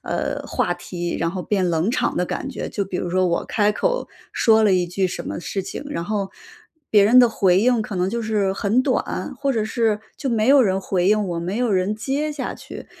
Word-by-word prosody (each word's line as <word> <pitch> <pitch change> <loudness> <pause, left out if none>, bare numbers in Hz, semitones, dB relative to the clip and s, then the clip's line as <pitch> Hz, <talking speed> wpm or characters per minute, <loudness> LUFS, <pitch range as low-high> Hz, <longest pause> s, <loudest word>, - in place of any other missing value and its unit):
呃， - - -3
话 - - 0
题 175 -1 -5
然 165 0 0
后 185 0 -4
变 190 -4 0
冷 170 +6 +1
场 - - 0
的 180 - +1
感 270 - -4
觉。 270 - -5
就 205 - -2
比 185 - -4
如 175 - -3
说 185 0 +2
我 170 - 0
开 210 -1 +1
口 - - -1 0.2
说 220 -1 +4
了 200 - +4
一 180 -1 +2
句 185 +2 0
什 180 - -5
么 - - -4
事 195 +2 -4
情， 265 - -7
然 170 - -3
后 200 0 -2 0.6
别 205 -2 +5
人 240 +5 +6
的 245 -2 +7
回 190 -4 +3
应 240 -1 +3
可 215 - -6
能 180 0 0
就 235 +2 -2
是 210 -3 0
很 215 +7 +1
短， - - -2
或 275 -1 0
者 220 -3 0
是 220 -1 0 0.2
就 270 -4 -3
没 225 +1 +1
有 275 -1 +7
人 190 -2 +1
回 185 -1 0
应 210 +1 +3
我， 170 - -3
没 180 +6 -3
有 245 -3 +1
人 190 +2 +1
接 280 +7 -2
下 290 -3 -4
去。 - - -10
210 Hz, 255 characters per minute, -22 LUFS, 185-230 Hz, 0.6 s, 的